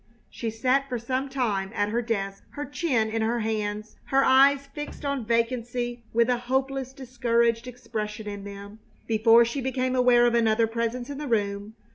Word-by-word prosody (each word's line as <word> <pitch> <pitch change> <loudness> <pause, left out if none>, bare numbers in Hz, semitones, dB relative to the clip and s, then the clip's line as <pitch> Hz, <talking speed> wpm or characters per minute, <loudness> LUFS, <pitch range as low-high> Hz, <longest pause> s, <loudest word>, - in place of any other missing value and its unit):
She 230 - -4
sat 255 +5 +1
for 250 - -2
some 255 +4 -2
time 215 -8 -1
at 205 0 +1
her 235 +3 0
desk, 195 -4 -3
her 290 0 -4
chin 260 -6 0
in 225 +1 -2
her 230 +1 0
hands, 215 -1 -3
her 270 0 +3
eyes 275 +1 +5
fixed 295 0 -7
on 280 -5 -2
vacancy 240 +1 -1
with 235 0 +3
a 250 -1 +1
hopeless, 265 +1 -1
discouraged 235 -2 0
expression 220 -3 -5
in 205 -1 -6
them, 200 +1 -9 0.3
before 225 +1 +5
she 235 +4 -3
became 255 0 -1
aware 245 -1 +5
of 240 - +3
another 225 -1 +3
presence 235 +3 -3
in 280 - -6
the 300 - -4
room. 205 -2 -1
235 Hz, 175 wpm, -26 LUFS, 220-255 Hz, 0.3 s, eyes